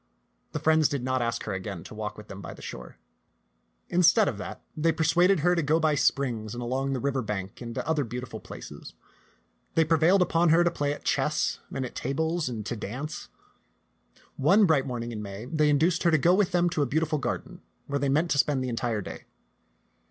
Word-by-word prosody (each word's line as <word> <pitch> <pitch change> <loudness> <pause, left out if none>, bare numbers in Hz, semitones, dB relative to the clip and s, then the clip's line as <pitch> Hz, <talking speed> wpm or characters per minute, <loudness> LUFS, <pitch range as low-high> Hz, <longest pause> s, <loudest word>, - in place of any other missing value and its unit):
The - - -2
friends 160 -1 +4
did 140 -4 -3
not 130 0 0
ask 115 0 -1
her 105 - -3
again 95 -2 -5
to - - -11
walk 105 -1 -5
with 105 - -11
them 100 +1 -9
by - - -8
the - - -14
shore. 60 - -8 0.9
Instead 180 +5 +4
of 105 - -2
that, - - -7
they 165 +2 +2
persuaded 175 +2 +3
her 175 +3 +3
to 170 - +1
go 155 +2 +2
by 155 -1 +2
springs 120 -6 0
and 120 - -4
along 135 +3 -1
the 130 - -1
river 135 0 0
bank 105 -3 -5
and 115 -1 -6
to - - -4
other 160 -2 +1
beautiful 120 -1 -6
places. - - -10 0.8
They 160 - +4
prevailed 165 +4 +4
upon 170 -1 +2
her 165 +2 +5
to 175 - +2
play 145 -3 -1
at 145 - -6
chess - - 0
and 135 - -3
tables 160 +1 -1
and 110 -4 -5
to 120 - -3
dance. 125 +8 -6 1.1
One 190 +10 +5
bright 150 -6 +2
morning 120 -2 -4
in 110 -2 -5
May 100 +2 -7
they 150 +2 +2
induced 165 +4 +2
her 170 - +4
to 160 - +4
go 170 +5 +4
with 195 -1 +2
them 175 0 +3
to 155 - 0
a 140 - +2
beau 155 +6 +1
tiful 155 -1 0
garden 125 - -4 0.2
where 140 0 -2
they 140 0 0
meant 155 +5 +1
to 140 - +2
spend 135 -2 +2
the 130 - -2
entire 115 -2 -1
day. - - -8
140 Hz, 215 wpm, -27 LUFS, 120-160 Hz, 1.1 s, her